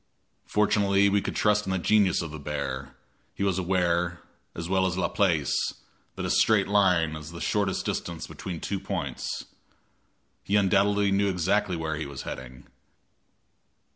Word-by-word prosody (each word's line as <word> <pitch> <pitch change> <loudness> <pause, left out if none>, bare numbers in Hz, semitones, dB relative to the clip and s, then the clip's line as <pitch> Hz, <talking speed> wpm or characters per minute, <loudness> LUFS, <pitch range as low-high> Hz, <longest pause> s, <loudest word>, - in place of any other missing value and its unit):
Fortunately 100 -1 +3
we 100 0 +2
could 100 - -4
trust 105 -1 +2
in - - -1
the 95 - +1
genius 95 -1 +3
of 80 - -6
the 80 - -7
bear; 70 -2 -4 0.4
he - - -2
was 95 -2 +1
aware, 90 -1 0 0.4
as 85 0 -5
well 95 0 +2
as 90 -1 -2
La 90 - +1
Place, 85 -9 +1 0.6
that - - -4
a - - -2
straight 110 -3 +4
line 90 -6 +3
is 75 0 -8
the 85 - -8
shortest 100 -1 0
distance 85 -2 -3
between 90 -4 -6
two 100 +4 -3
points. - - -4 1.0
He 100 - 0
undoubtedly 100 0 +3
knew 100 +1 +2
exactly 90 +1 +1
where 80 -2 -3
he 80 -1 -4
was 70 -2 -7
heading. 65 0 -8
95 Hz, 160 wpm, -27 LUFS, 85-100 Hz, 1.0 s, straight